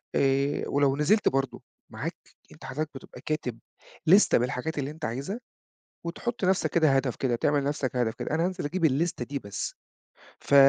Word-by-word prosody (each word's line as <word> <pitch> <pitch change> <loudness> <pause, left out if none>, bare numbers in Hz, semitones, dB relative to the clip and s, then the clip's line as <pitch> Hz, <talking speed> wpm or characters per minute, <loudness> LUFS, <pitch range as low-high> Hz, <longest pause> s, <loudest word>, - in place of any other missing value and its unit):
آآ 140 +1 +2
ولو 140 -1 +3
نزلت 205 +9 +4
برضه 135 0 -1 0.3
معاك - - -4 0.3
أنت - - -12
حضرتك 150 +3 -3
بتبقى 135 - -10
كاتب 140 -7 -2 0.5
لِستة 195 +6 +7
بالحاجات 125 +6 -1
اللي 140 +1 -2
أنت 155 - -6
عايزها، 140 - -3 0.7
وتحُط 230 +7 -3
لنفسك 190 0 +3
كده 160 -3 +4
هدف 135 -2 0
كده 125 -3 0
تعمل 145 +4 +2
لنفسك 140 -2 -1
هدف 120 -2 +1
كده - - -4
أنا 165 - +2
هانزل 180 -3 -2
أجيب 165 +3 0
اللِستة 150 -2 +1
دي 140 +2 -3
بس، 100 -5 -5 0.7
ف - - 0
145 Hz, 170 wpm, -28 LUFS, 130-165 Hz, 0.7 s, لِستة